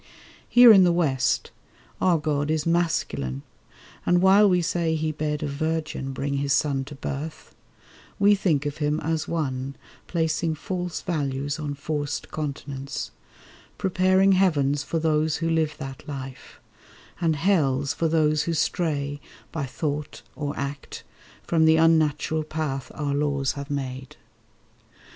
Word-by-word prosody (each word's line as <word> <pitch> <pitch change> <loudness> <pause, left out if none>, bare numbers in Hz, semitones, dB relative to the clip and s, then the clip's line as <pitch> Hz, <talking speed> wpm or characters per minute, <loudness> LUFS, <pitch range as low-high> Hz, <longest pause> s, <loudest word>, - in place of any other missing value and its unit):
Here 245 -2 +9
in 195 -2 +7
the 175 - +4
West, 145 -7 +1 0.5
our 180 -3 +4
God 150 -1 -1
is 155 -1 0
Masculine; 115 - 0 0.6
And 175 0 +3
while 195 +3 +6
we 180 -1 +3
say 165 -1 0
He 155 0 -1
bade 150 -1 -2
a - - -1
Virgin 155 -1 -2
bring 140 +1 -2
His 140 0 +1
Son 140 -3 +1
to 145 +2 -9
birth, 145 +3 -6 0.6
we 205 0 +5
think 165 -8 +1
of 145 0 -3
Him 150 0 0
as 160 -1 -1
One 135 -4 -2 0.3
Placing 160 -1 0
false 180 +2 -4
values 145 -2 -2
on 145 -2 -3
forced 145 0 -4
continence— 140 -2 -5 0.7
Preparing 190 +1 +3
heavens 145 -7 +2
for 165 - -3
those 155 -1 +1
who 165 - -2
live 160 -2 0
that 135 -2 -8
life— 135 -2 -8 0.6
And 165 -2 +2
hells 145 -6 +1
for 165 - 0
those 155 -1 +2
who 170 - -1
stray 145 -3 -1 0.3
by 150 -4 -3
thought 150 +2 -4
or 145 -1 -4
act 140 0 -5 0.4
From 160 -2 +2
the 160 0 +5
unnatural 160 -1 +2
path 150 -4 -4
our 145 -2 -2
laws 140 -2 0
have 140 +1 -7
made. 130 -2 -5
150 Hz, 140 wpm, -25 LUFS, 140-165 Hz, 0.7 s, Here